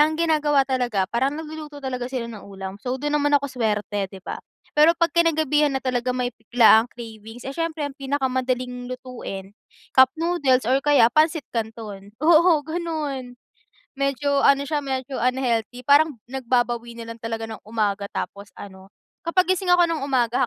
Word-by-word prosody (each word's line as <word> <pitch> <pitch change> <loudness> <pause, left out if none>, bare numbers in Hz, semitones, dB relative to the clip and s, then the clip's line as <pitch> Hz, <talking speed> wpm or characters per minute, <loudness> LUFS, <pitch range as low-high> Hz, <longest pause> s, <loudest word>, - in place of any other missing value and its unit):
Ang 310 +1 +4
ginagawa 300 -4 +2
talaga, 245 -7 0
parang 265 +5 +1
nagluluto 310 -1 -8
talaga 255 -3 -4
sila 255 -3 -3
ng 225 -3 -8
ulam. 195 0 -8
So, 255 +3 -2
dun 295 +2 -3
naman 290 0 +3
ako 280 -1 -3
swerte, 210 -4 -1
'di 190 -1 -13
ba? - - -5 0.3
Pero 305 +2 +6
'pag 335 -2 +1
kinagabihan 305 -3 +3
na 265 - -1
talaga 255 -1 -1
may 250 -1 -1
biglaang 225 0 +5
cravings. 225 +1 -10
Eh, 270 - -5
siyempre 330 -3 -2
ang 280 - -8
pinakamadaling 255 -2 -2
lutuin, 235 -6 -7 0.4
cup 260 0 +7
noodles 290 -8 +2
or 265 +3 +2
kaya 285 -6 +5
pansit 310 -1 +2
kanton. 215 -3 -5
Oo, 330 +2 +5
ganun. 300 -7 -4 0.6
Medyo 275 +1 +1
ano 280 0 +5
siya, 300 +1 -1
medyo 265 -1 -4
unhealthy 250 -1 -1
parang 290 +3 +4 0.2
nagbabawi 240 -2 -1
na 230 0 -7
lang 230 - -10
talaga 225 0 -4
ng 220 -1 -8
umaga 210 -2 -1
tapos 200 +1 -6
ano, 190 -1 -11 0.4
kapag 355 +2 +2
gising 365 0 -1
ako 355 0 +6
ng 330 -2 -2
umaga 250 -4 +1
260 Hz, 165 wpm, -23 LUFS, 230-295 Hz, 0.6 s, cup